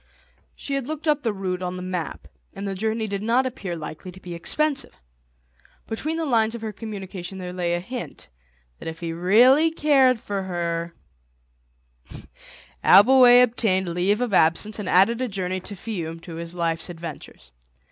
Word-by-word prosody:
She 280 - -6
had 275 -2 -2
looked 310 +1 -5
up 300 -1 +2
the 230 - 0
route 185 -2 -3
on 180 0 -3
the 180 - -6
map, 180 -3 -5 0.3
and 200 +1 -5
the 195 - -2
journey 220 +3 -1
did 200 -2 -4
not 235 +4 +2
appear 205 -9 -4
likely 155 +3 -8
to 185 - -14
be 180 -2 -8
expensive. 280 - -1 0.9
Between 305 +9 -3
the 325 - -1
lines 225 -4 +2
of 230 - -8
her 220 - -3
communication 195 -3 -7
there 180 -1 -6
lay 175 -1 -1
a - - -1
hint 240 +7 -7 0.5
that - - -8
if 160 0 -6
he 165 -1 -4
really 245 - +5
cared 275 -6 +3
for 200 -2 -4
her— 170 -2 -3 1.9
Abbleway 245 +3 +8
obtained 205 -6 +1
leave 185 +6 +1
of 245 -4 -1
absence 185 +6 +2
and 200 - -4
added 225 +7 +4
a 255 - 0
journey 185 -3 -2
to 200 +2 -8
Fiume 175 -5 -5
to 170 - -10
his 170 +1 -6
life's 165 -1 -1
adventures. 165 - -9
195 Hz, 170 wpm, -24 LUFS, 175-240 Hz, 1.9 s, Abbleway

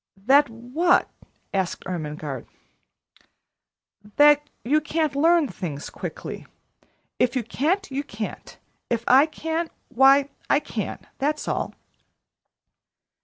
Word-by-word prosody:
"That 270 +8 +4
what?" 255 +11 +1 0.4
asked 190 -3 -1
Ermengarde. 150 -6 -5 1.7
"That 295 0 +5
you 300 +6 +2
can't 310 -1 -1
learn 325 +1 +4
things 155 - -6
quickly. - - -7 0.7
If 250 +1 +2
you 255 - 0
can't, 320 - -1
you 275 +2 -2
can't. 215 -5 -7 0.3
If 235 -1 0
I 270 +4 +6
can, 320 +1 -3 0.2
why, 270 +2 +5 0.2
I - - +4
can - - -5
that's 300 +2 -1
all." - - -2
275 Hz, 105 wpm, -24 LUFS, 225-305 Hz, 1.7 s, I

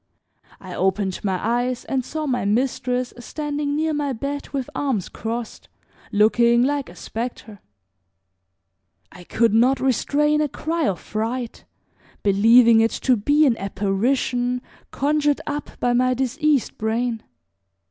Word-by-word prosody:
I 185 -2 -9
opened 190 0 -1
my 190 -2 0
eyes 245 +2 -1
and 265 -2 -1
saw 310 +4 -4
my 255 -4 -1
mistress 250 +3 0
standing 290 +3 -3
near 315 +1 0
my 290 -2 -1
bed 280 +4 -5
with 270 -3 -3
arms 260 -10 -1
crossed, 230 0 -6 0.4
looking 235 +3 +4
like 285 +1 -1
a - - -13
specter. 225 -3 -6 1.5
I 180 - -13
could 230 +4 +1
not 250 +4 +4
restrain 295 +4 +1
a 300 - 0
cry 320 +3 -2
of 180 -4 -1
fright, 230 +2 -4 0.6
believing 225 +3 +6
it 225 - +3
to 255 - +4
be 290 +8 +3
an 250 -5 +3
apparition 245 +6 -1 0.3
conjured 295 +1 +1
up 295 -1 -4
by 245 - +1
my 255 +1 +2
diseased 275 +2 0
brain. 225 +1 -1
250 Hz, 130 wpm, -22 LUFS, 225-285 Hz, 1.5 s, believing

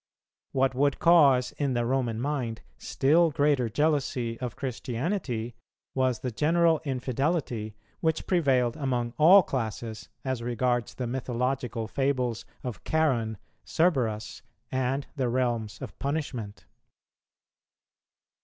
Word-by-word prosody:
What 135 0 +2
would 140 +2 +2
cause 140 -7 +5
in 140 -3 0
the 120 0 +1
Roman 120 -3 0
mind 125 -4 -2 0.2
still 160 +5 +3
greater 145 -5 +2
jealousy 130 -3 0
of 125 -3 -4
Christianity 125 - -3 0.4
was 130 -3 +1
the 125 - -2
general 165 +5 +3
infidelity 130 - -2 0.2
which 160 -1 0
prevailed 130 -9 +2
among 125 -5 -1
all 180 +5 +8
classes 110 -4 -4 0.2
as 130 -2 -2
regards 120 0 -1
the 125 - -3
mythological 125 -1 -2
fables 130 -2 -1 0.2
of 120 -7 -6
Charon, 125 -9 +1 0.3
Cerberus, 120 -11 0 0.3
and 130 +2 0
the 130 -3 +1
realms 115 -5 -1
of - - -9
punishment. 135 -8 -4
130 Hz, 110 wpm, -27 LUFS, 120-145 Hz, 0.4 s, all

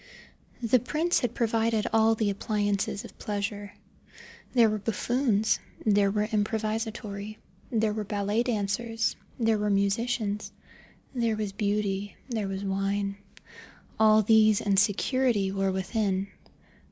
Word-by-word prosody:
The 235 +2 +4
prince 310 +8 0
had 245 -1 -2
provided 225 -2 +1
all 225 0 +4
the 215 -2 0
appliances 205 -1 -1
of - - -14
pleasure. 205 0 -4 0.8
There 235 -3 +5
were 215 0 -1
buffoons, 225 +1 +1 0.3
there 205 -2 +4
were 210 +1 0
improvisatori, 215 -1 -3 0.3
there 220 -2 +1
were 215 0 -3
ballet 205 +2 0
dancers, 225 0 -1 0.2
there 225 -3 +2
were 210 0 0
musicians, 205 +1 0 0.6
there 230 -3 0
was 210 -2 -3
Beauty, 205 -1 -1
there 220 -6 -2
was 195 0 -4
wine. 195 +1 -1 0.8
All 215 0 +6
these 215 0 +5
and 200 -2 +2
security 210 0 +1
were 195 0 0
within. 190 0 -1
210 Hz, 120 wpm, -27 LUFS, 200-225 Hz, 0.8 s, All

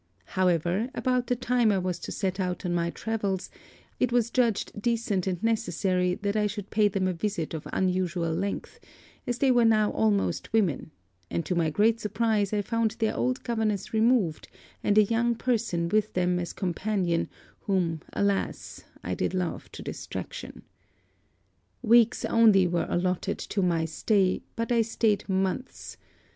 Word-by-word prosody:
However, 185 - +1
about 250 -2 0
the 245 - +1
time 245 -2 +2
I 200 - +2
was 185 -1 -2
to - - -7
set 190 0 -2
out 180 0 -2
on 175 - 0
my 170 0 0
travels, 205 -2 -3 0.5
it 250 - +2
was 240 -1 +2
judged 230 -4 0
decent 230 -5 0
and 180 0 -2
necessary 185 -5 +1
that 200 0 0
I 210 -1 +2
should 205 -1 -6
pay 215 -1 +4
them 190 -2 0
a 185 - 0
visit 175 -2 -3
of 160 - -5
unusual 180 -3 0
length, 195 +5 -4 0.5
as 245 -1 -1
they 265 +1 +3
were 245 -1 +4
now 215 -2 +4
almost 210 -2 0
women; 190 - +1 0.4
and 170 - -2
to - - -1
my 170 -2 +1
great 215 +8 +2
surprise 210 -1 0
I 210 -1 0
found 225 +1 0
their 220 -2 0
old 255 +1 -1
governess 220 -5 -1
removed, 220 -7 +2 0.4
and 205 - +2
a 215 - +8
young 235 +3 +1
person 225 -9 0
with 215 +3 +1
them 180 0 +1
as 175 -1 -4
companion 185 -1 -1 0.3
whom 175 -6 -1
alas 200 -1 -2 0.2
I - - -2
did - - -1
love 180 -2 -3
to - - -8
distraction. - - -7 1.2
'Weeks 235 0 +4
only 215 -5 +5
were 175 -1 0
allotted 185 +2 -1
to 200 - -3
my 170 -3 +1
stay, 185 +4 +1
but 230 +1 -2
I 235 -1 +4
staid 220 -2 0
months. 190 +6 -2
200 Hz, 160 wpm, -27 LUFS, 180-225 Hz, 1.2 s, a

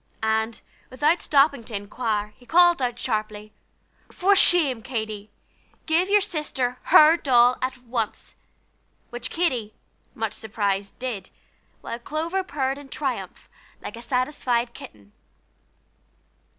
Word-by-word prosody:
and, 220 +1 0 0.3
without 295 +7 +1
stopping 280 -3 +3
to 225 - -8
inquire, 210 +1 -2
he 255 - -21
called 345 +3 +4
out 245 -1 -1
sharply: 215 -3 -4 0.6
"For 395 +2 +3
shame, 305 - +5
Katy! 220 -3 -5 0.6
give 335 +4 +2
your 410 0 +5
sister 265 -8 -3
her 310 +2 +7
doll 245 -4 +4
at 255 0 -2
once!" 230 -3 -4 0.8
which 240 +1 -5
Katy, 250 -11 -1 0.4
much 220 -2 -3
surprised, 200 -2 -3
did; 245 -6 -5 0.5
while 235 - -6
Clover 325 +9 -3
purred 275 -5 -2
in 285 -1 -13
triumph, 270 -3 -4 0.3
like - - -8
a 235 - -9
satisfied 250 -1 -1
kitten. 100 - -13
250 Hz, 120 wpm, -24 LUFS, 220-295 Hz, 0.8 s, her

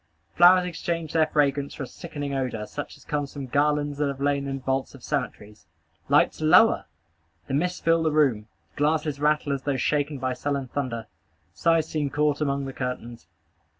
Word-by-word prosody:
Flowers 180 +1 +6
exchange 170 -2 -3
their 160 -1 +3
fragrance 140 -2 0
for - - -5
a - - -3
sickening 145 -1 -6
odor, 125 -5 -2
such 145 +6 -7
as - - -20
comes 145 -2 -2
from 140 -2 -6
garlands 145 +2 0
that 145 - +2
have 140 -1 -4
lain 140 0 0
in 135 0 -3
vaults 130 0 -2
of - - -15
cemeteries. 105 -3 -4 0.4
Lights - - +3
lower! 155 +9 +5 0.6
Mists 175 +7 -1
fill 165 0 +3
the 160 -1 +1
room. 130 -9 +2 0.3
Glasses 150 -1 0
rattle 150 -1 +1
as 135 - -3
though 140 -1 -1
shaken 145 +2 0
by 130 -1 -2
sullen 140 -1 -3
thunder. 120 -5 -3 0.5
Sighs 165 -2 +2
seem 150 -2 -2
caught 150 +1 0
among 140 -1 0
the 135 - -6
curtains. 120 -5 -5
145 Hz, 175 wpm, -25 LUFS, 135-155 Hz, 0.6 s, Flowers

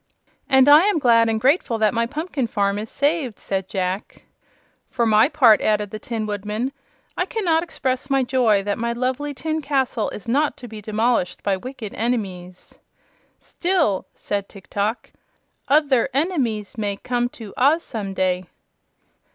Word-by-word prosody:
"And 265 -1 +5
I 300 +5 +8
am 410 -4 +2
glad 230 -5 +4
and 220 0 0
grateful 260 -2 +2
that 215 -1 +2
my 230 0 +1
pumpkin 295 -2 -3
farm 200 -2 0
is 215 +1 -6
saved," 285 - -1
said 195 -1 -3
Jack. 185 0 -3 0.7
"For 240 -2 0
my 220 +3 +5
part," 230 -9 +5
added 210 -2 0
the 215 - -6
Tin 225 -1 -4
Woodman, 210 +5 -3 0.4
"I 360 - -1
cannot 350 -8 +1
express 265 -5 -3
my 270 -1 +2
joy 245 -6 +2
that 205 +1 -2
my 235 0 -1
lovely 260 +4 -2
tin 315 +4 -2
castle 265 -5 0
is 210 - -9
not 285 +5 +1
to 245 - -10
be 215 -1 -9
demolished 215 -2 0
by 200 -1 +1
wicked 235 0 -8
enemies." 190 -6 -4 0.6
"Still," 345 - 0
said 200 -1 -4
Tiktok, 205 +3 -4 0.6
"o 300 +1 +4
ther 260 -1 +2
en 315 +7 +2
e 360 - -4
mies 220 -3 -2
may 205 -2 -2
come 245 +1 -1
to 215 -4 -9
Oz 295 +6 +3
some 200 -5 -5
day." 185 -1 0
235 Hz, 165 wpm, -22 LUFS, 210-275 Hz, 0.7 s, I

